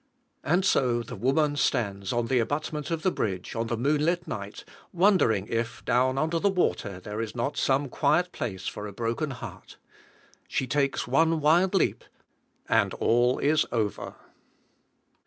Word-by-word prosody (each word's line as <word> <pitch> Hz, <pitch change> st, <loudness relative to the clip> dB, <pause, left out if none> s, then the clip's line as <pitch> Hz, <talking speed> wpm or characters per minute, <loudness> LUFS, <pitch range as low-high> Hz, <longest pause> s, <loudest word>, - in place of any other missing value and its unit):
And 175 Hz, +6 st, +2 dB
so, 120 Hz, -8 st, +2 dB
the -, -, -8 dB
woman 145 Hz, +4 st, +1 dB
stands 100 Hz, -9 st, 0 dB
on 120 Hz, -1 st, 0 dB
the 125 Hz, +1 st, +1 dB
abutment 150 Hz, +4 st, -2 dB
of 165 Hz, -1 st, -2 dB
the 185 Hz, -, +2 dB
bridge, 95 Hz, -, -3 dB
on 115 Hz, 0 st, -1 dB
the 120 Hz, -, -2 dB
moon 145 Hz, +5 st, +1 dB
lit 175 Hz, +2 st, 0 dB
night, 100 Hz, 0 st, -6 dB, 0.3 s
wondering 170 Hz, -, +3 dB
if, 115 Hz, 0 st, -3 dB
down 130 Hz, +1 st, +2 dB
under 160 Hz, +3 st, 0 dB
the 200 Hz, -, +2 dB
water, 110 Hz, -, -1 dB
there 105 Hz, +4 st, -5 dB
is 115 Hz, 0 st, -5 dB
not 125 Hz, +4 st, -2 dB
some 140 Hz, +1 st, +1 dB
quiet 155 Hz, +7 st, +1 dB
place 95 Hz, -6 st, -5 dB
for 105 Hz, -, -5 dB
a 100 Hz, -, -9 dB
broken 115 Hz, -, -2 dB
heart. 120 Hz, -7 st, -9 dB, 0.7 s
She 130 Hz, -, -1 dB
takes 140 Hz, +2 st, 0 dB
one 160 Hz, +5 st, +3 dB
wild 175 Hz, +6 st, +3 dB
leap, 190 Hz, -, +1 dB, 0.6 s
and -, -, +2 dB
all 120 Hz, +2 st, +2 dB
is 150 Hz, +2 st, +2 dB
over! 110 Hz, -4 st, -2 dB
130 Hz, 160 wpm, -27 LUFS, 115-155 Hz, 0.7 s, wondering